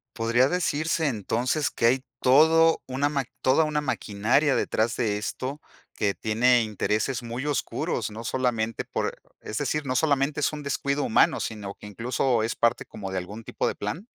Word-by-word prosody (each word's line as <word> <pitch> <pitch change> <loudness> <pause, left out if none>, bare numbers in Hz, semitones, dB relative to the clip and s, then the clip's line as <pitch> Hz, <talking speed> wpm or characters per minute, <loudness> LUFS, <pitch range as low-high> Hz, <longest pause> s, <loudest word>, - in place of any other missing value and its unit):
¿Podría 120 +2 +3
decirse 160 -2 0
entonces 125 +5 -1
que 115 - +1
hay 130 +2 +2 0.2
todo 160 +5 +5
una 135 +2 0
ma 140 -3 -1 0.2
toda 135 +5 +4
una 150 -1 0
maquinaria 130 +2 +1
detrás 110 +1 0
de 105 -4 0
esto, 130 +7 -4 0.3
que 100 -2 0
tiene 120 +3 +3
intereses 110 +4 -1
muy 120 +4 -4
oscuros, 145 -5 -2
no 110 - -7
solamente 115 -2 -1
por, - - -3 0.2
es 110 - -5
decir, 145 0 -1
no 130 - -1
solamente 140 0 +1
es 150 - +1
un 150 -1 -6
descuido 140 0 -1
humano, 110 - +3
sino 100 -3 -5
que 105 - -11
incluso 120 +2 0
es 115 - -1
parte 115 - +1
como 95 -2 -7
de 95 - -2
algún 105 +5 -7
tipo - - -2
de - - 0
plan? 145 - -5
125 Hz, 175 wpm, -26 LUFS, 110-145 Hz, 0.3 s, todo